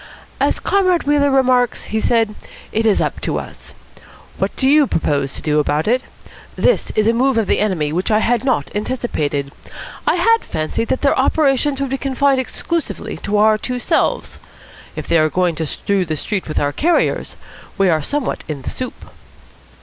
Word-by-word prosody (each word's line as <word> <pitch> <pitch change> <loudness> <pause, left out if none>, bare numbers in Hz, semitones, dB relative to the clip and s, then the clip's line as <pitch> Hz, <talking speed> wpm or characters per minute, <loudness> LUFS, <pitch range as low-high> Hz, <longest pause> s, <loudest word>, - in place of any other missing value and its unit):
"As - - +1
Comrade 370 -3 +2
Wheeler 285 0 +2
remarks," 255 -2 +2
he 220 - +2
said, 225 -1 +1 0.4
"it 225 +1 +1
is 210 - +3
up - - -2
to - - -1
us. - - -9 0.6
What - - -1
do 265 - 0
you 290 0 +5
propose 140 - -1
to - - -8
do 150 -1 +2
about 150 +3 0
it? 250 +3 +2 0.5
This - - +1
is 215 - +2
a 225 - +3
move 260 +1 +2
of 225 - +2
the - - +1
enemy 170 -8 0
which 180 +3 -1
I 215 - +4
have 230 +1 +1
not 255 -3 0
anticipated. 155 - -2 0.6
I - - +4
had 455 0 +4
fancied 155 +8 -3
that - - -1
their 280 - +3
operations 275 0 +2
would 275 -1 -2
be 270 - -1
confined 275 0 +1
exclusively 270 - -3
to 205 +5 -2
our 215 +1 +4
two 250 +2 -3
selves. 485 - 0 0.6
If - - -6
they 170 - +3
are 155 0 +3
going 180 +1 +1
to 160 0 -3
strew 200 +5 -1
the 160 -3 -3
street 195 +6 -3
with 155 - -4
our 145 0 0
carriers, 345 +3 0 0.4
we 195 - +3
are 160 -3 +2
somewhat 285 - -2
in 145 -4 -5
the - - -4
soup." 255 -1 -6
225 Hz, 190 wpm, -18 LUFS, 170-270 Hz, 0.6 s, you